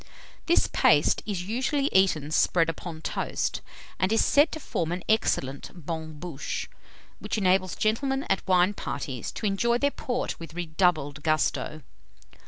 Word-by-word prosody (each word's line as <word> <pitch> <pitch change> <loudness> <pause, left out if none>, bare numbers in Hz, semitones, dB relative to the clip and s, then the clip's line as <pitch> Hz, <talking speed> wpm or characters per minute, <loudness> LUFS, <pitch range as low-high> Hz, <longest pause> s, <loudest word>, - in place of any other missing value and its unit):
This 340 - +4
paste - - +3
is 195 -4 -2
usually 260 +7 0
eaten 170 -6 +3
spread 165 +1 +3
upon 165 0 -6
toast, - - -2 0.4
and 185 +3 +1
is 225 - +3
said 290 +3 +4
to 315 - -5
form 170 - -2
an 180 +1 -3
excellent 140 -10 0 0.2
bonne 160 -2 -5
bouche, 165 -5 -4 0.5
which - - -3
enables 185 -2 +2
gentlemen 270 +5 0
at 195 - -1
wine 185 +1 +4
parties 135 - -5
to - - -5
enjoy 235 +4 +2
their 285 +3 +1
port 250 -2 -3
with 165 -1 -9
redoubled 155 -4 0
gusto. 155 0 0
180 Hz, 145 wpm, -27 LUFS, 160-220 Hz, 0.5 s, This